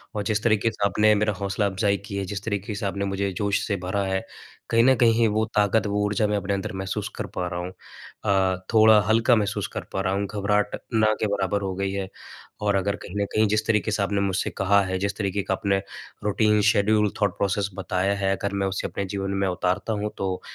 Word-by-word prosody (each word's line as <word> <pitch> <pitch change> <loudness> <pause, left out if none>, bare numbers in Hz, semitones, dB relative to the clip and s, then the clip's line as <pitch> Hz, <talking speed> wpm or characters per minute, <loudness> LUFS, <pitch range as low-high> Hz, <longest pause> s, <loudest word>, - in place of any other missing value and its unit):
और 105 - -1
जिस 105 +1 -1
तरीक़े 115 0 +2
से 100 - -1
आपने 105 +1 +4
मेरा 105 0 +1
हौसला-अफ़ज़ाई 100 +1 0
की 100 - -5
है, 100 - -2
जिस 100 +1 -5
तरीक़े 105 0 -3
से 100 - -4
आपने 100 0 -2
मुझे 100 0 -1
जोश 100 -1 +1
से 100 - 0
भरा 100 +2 0
है, 95 0 -1 0.5
कहीं 115 0 +4
न 130 +1 +5
कहीं 115 -1 +4
वो 110 +1 +1
ताकत, 105 0 +3
वो 105 0 0
ऊर्जा 105 +1 +1
मैं 105 0 0
अपने 100 0 -2
अंदर 100 +2 -3
महसूस 95 - -3
कर - - -4
पा 90 - -1
रहा 90 0 -4
हूँ। 90 +1 -5 0.5
अ, 95 -2 +1
थोड़ा 110 -1 +7
हल्का 115 +2 +4
महसूस 105 -3 -1
कर - - -3
पा 95 - 0
रहा 95 0 0
हूँ, 100 +1 0
घबराहट 105 0 0 0.2
ना 110 -1 +4
के 110 - +2
बराबर 100 0 0
हो 95 -1 -2
गयी 95 0 -2
है, 100 -1 -3 0.5
और 105 -1 +1
अगर 100 +1 0
कहीं 95 - -9
न - - +1
कहीं 110 0 +3
जिस 105 +1 0
तरीक़े 110 -1 +1
से 105 - 0
आपने 100 0 0
मुझसे 95 -1 0
कहा 100 +1 +4
है, 95 0 -2
जिस 100 0 -1
तरीक़े 100 -1 -1
का - - -1
आपने 95 0 0 0.4
रूटीन, 105 +1 +2
शेड्यूल, 105 0 +2
थॉट 100 -3 +1
प्रोसेस 100 0 0
बताया 95 0 0
है, 95 0 +1
अगर 100 0 -3
मैं 95 - +1
उसे 95 0 -2
अपने 100 - -4
जीवन 95 0 -2
में - - +2
उतारता 90 +3 -1
हूँ, 105 0 -2
तो 95 -1 -2
100 Hz, 230 wpm, -24 LUFS, 95-105 Hz, 0.5 s, थोड़ा